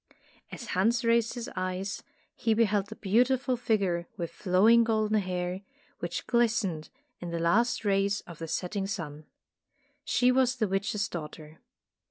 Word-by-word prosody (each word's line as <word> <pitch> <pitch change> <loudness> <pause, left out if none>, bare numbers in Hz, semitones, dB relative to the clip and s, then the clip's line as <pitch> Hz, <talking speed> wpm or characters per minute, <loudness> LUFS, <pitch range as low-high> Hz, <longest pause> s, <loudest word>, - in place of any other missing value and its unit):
As 235 - -8
Hans 230 +6 +1
raised 230 0 +2
his 240 -1 -5
eyes, 185 +2 -3 0.3
he 225 -1 +1
beheld 210 -3 +2
the 220 - -9
beautiful 250 +6 +2
figure 195 -8 0
with 170 -3 -4
flowing 210 +5 +4
golden 215 -1 +1
hair, 180 -1 -3 0.4
which - - -4
glistened 225 -9 +1 0.3
in 175 - -6
the 170 - -3
last 215 +8 +2
rays 200 0 +1
of 170 -3 -12
the 165 - -5
setting 195 +4 -2
sun. 155 -7 -6 0.8
She 250 0 +3
was 255 -1 +3
the 220 -4 0
witch's 200 +2 -1
daughter. 155 -1 -8
200 Hz, 145 wpm, -29 LUFS, 180-230 Hz, 0.8 s, flowing